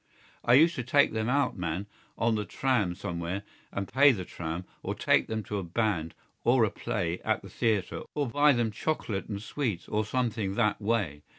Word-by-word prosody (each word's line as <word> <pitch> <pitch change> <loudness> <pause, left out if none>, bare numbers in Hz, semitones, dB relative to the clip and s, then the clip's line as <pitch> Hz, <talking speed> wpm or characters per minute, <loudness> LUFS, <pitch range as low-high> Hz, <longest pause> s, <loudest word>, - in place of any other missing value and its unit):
I 120 - +5
used 165 +5 +6
to 125 - -1
take 140 +2 +3
them 110 +1 -1
out, 140 0 +2
man, 90 +1 -3 0.3
on 115 0 +2
the 105 -1 0
tram 105 -6 0
somewhere 85 +3 -4 0.3
and 100 -1 -3
pay 140 +2 +6
the 95 -7 -3
tram 85 +2 -5 0.2
or - - -3
take - - +3
them 110 -1 -3
to 105 0 -3
a - - -4
band 85 -3 -1 0.3
or 120 0 +4
a 110 - +2
play 95 -7 -2
at 110 -1 0
the 95 - -10
theatre 110 -5 0
or 145 -2 0
buy 145 +4 +4
them 120 -3 +1
chocolate 105 -4 -2
and 100 -2 -3
sweets 110 -3 -3
or 105 +1 0
something 110 -4 -1
that 105 -2 +1
way. 100 -9 0
110 Hz, 195 wpm, -29 LUFS, 95-120 Hz, 0.3 s, used